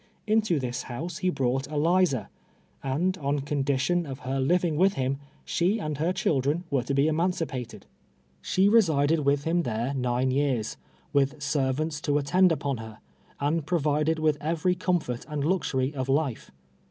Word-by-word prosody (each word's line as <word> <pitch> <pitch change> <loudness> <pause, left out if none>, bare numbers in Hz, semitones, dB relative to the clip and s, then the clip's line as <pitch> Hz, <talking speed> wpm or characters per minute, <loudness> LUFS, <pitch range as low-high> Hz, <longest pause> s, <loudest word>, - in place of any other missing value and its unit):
Into 215 -6 +2
this 125 -1 -3
house 165 +9 -5
he 185 -2 +1
brought 135 -4 0
Eliza; 155 - +1 0.5
and, 160 +8 0
on 140 0 -1
condition 145 +4 0
of 135 -1 -7
her 135 +1 -2
living 170 +4 +2
with 190 +5 +4
him, 135 -1 -1 0.3
she 185 +6 +1
and 155 -8 -4
her 165 +4 +1
children 150 -1 0
were 135 -2 +2
to 135 +3 -2
be 140 +2 +3
emancipated. 160 -6 -2 0.6
She 190 - +2
resided 165 -8 +4
M'itli 140 -1 +1
him 170 +3 +1
there 120 -1 -2
nine 125 0 0
years, 130 -5 0 0.4
M'ith 140 +2 +2
servants 150 +2 -1
to 145 -4 +1
attend 180 +6 +4
npon 140 -6 -1
her, 110 -1 -9 0.4
and 150 +3 0
provided 155 -1 +1
with 155 -2 +1
every 165 +4 +1
comfort 175 -9 -1
and 150 -2 -2
luxury 145 -6 0
of 130 -2 -3
life. 140 -3 0
145 Hz, 155 wpm, -27 LUFS, 135-170 Hz, 0.6 s, with